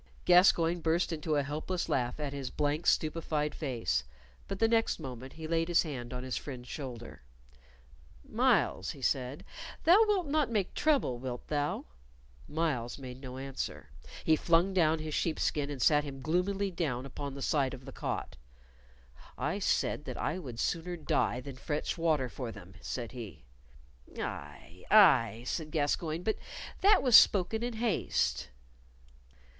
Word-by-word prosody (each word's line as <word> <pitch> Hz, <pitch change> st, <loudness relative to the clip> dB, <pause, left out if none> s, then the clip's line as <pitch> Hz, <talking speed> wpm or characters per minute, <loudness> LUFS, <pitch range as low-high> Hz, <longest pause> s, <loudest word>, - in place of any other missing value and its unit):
Gascoyne 175 Hz, -1 st, +5 dB
burst 165 Hz, +2 st, +1 dB
into 155 Hz, -1 st, -1 dB
a 145 Hz, -, +2 dB
helpless 155 Hz, +5 st, -3 dB
laugh 125 Hz, +1 st, -1 dB
at 145 Hz, -2 st, -3 dB
his 140 Hz, -2 st, -4 dB
blank, 150 Hz, +3 st, -1 dB
stupefied 155 Hz, -1 st, +1 dB
face, 115 Hz, -, -1 dB, 0.4 s
but 195 Hz, -, -4 dB
the 225 Hz, -, +3 dB
next 225 Hz, -4 st, +2 dB
moment 130 Hz, -3 st, -7 dB
he 160 Hz, -, -8 dB
laid 165 Hz, +1 st, 0 dB
his 175 Hz, -1 st, +4 dB
hand 130 Hz, -7 st, -6 dB
on 125 Hz, 0 st, -5 dB
his 130 Hz, -1 st, -3 dB
friend's 125 Hz, -3 st, -6 dB
shoulder. 125 Hz, -5 st, -7 dB, 1.1 s
"Myles," 90 Hz, -, +2 dB
he 140 Hz, -, -7 dB
said, 130 Hz, +2 st, -1 dB, 0.4 s
"thou 365 Hz, +7 st, +7 dB
wilt 395 Hz, -4 st, +2 dB
not 295 Hz, -2 st, +1 dB
make 210 Hz, -5 st, -1 dB
trouble, 280 Hz, -, +1 dB
wilt 125 Hz, -1 st, -6 dB
thou?" 145 Hz, -1 st, -1 dB, 0.6 s
Myles 150 Hz, -7 st, -1 dB
made 130 Hz, -2 st, -9 dB
no 130 Hz, -1 st, -7 dB
answer. 135 Hz, 0 st, -5 dB, 0.3 s
He 160 Hz, -, +4 dB
flung 170 Hz, +4 st, +2 dB
down 165 Hz, -3 st, +3 dB
his 155 Hz, -1 st, -5 dB
sheepskin 150 Hz, -3 st, 0 dB
and 145 Hz, -2 st, -5 dB
sat 150 Hz, +4 st, +4 dB
him 140 Hz, -2 st, -7 dB
gloomily 190 Hz, +4 st, 0 dB
down 140 Hz, -8 st, -2 dB
upon 140 Hz, +1 st, -6 dB
the 140 Hz, -, -7 dB
side 135 Hz, -3 st, +1 dB
of 130 Hz, 0 st, -14 dB
the 135 Hz, -, -8 dB
cot. -, -, -4 dB, 1.0 s
"I -, -, -1 dB
said -, -, 0 dB
that -, -, -5 dB
I 180 Hz, -, -2 dB
would 125 Hz, -9 st, -8 dB
sooner 175 Hz, +1 st, -1 dB
die 130 Hz, -5 st, 0 dB
than 135 Hz, 0 st, -9 dB
fetch 150 Hz, +3 st, -2 dB
water 155 Hz, -6 st, +1 dB
for 120 Hz, -1 st, -6 dB
them," 95 Hz, -4 st, -12 dB
said 120 Hz, -3 st, -5 dB
he. 115 Hz, -, -9 dB, 0.8 s
"Aye, -, -, -7 dB
aye," 110 Hz, +4 st, +6 dB
said 155 Hz, +3 st, -3 dB
Gascoyne; 155 Hz, +2 st, -1 dB
"but 220 Hz, -, 0 dB, 0.4 s
that 405 Hz, +2 st, +5 dB
was 250 Hz, -4 st, +6 dB
spoken 205 Hz, +3 st, +6 dB
in 240 Hz, 0 st, -2 dB
haste." 225 Hz, -3 st, 0 dB
150 Hz, 155 wpm, -31 LUFS, 130-175 Hz, 1.1 s, thou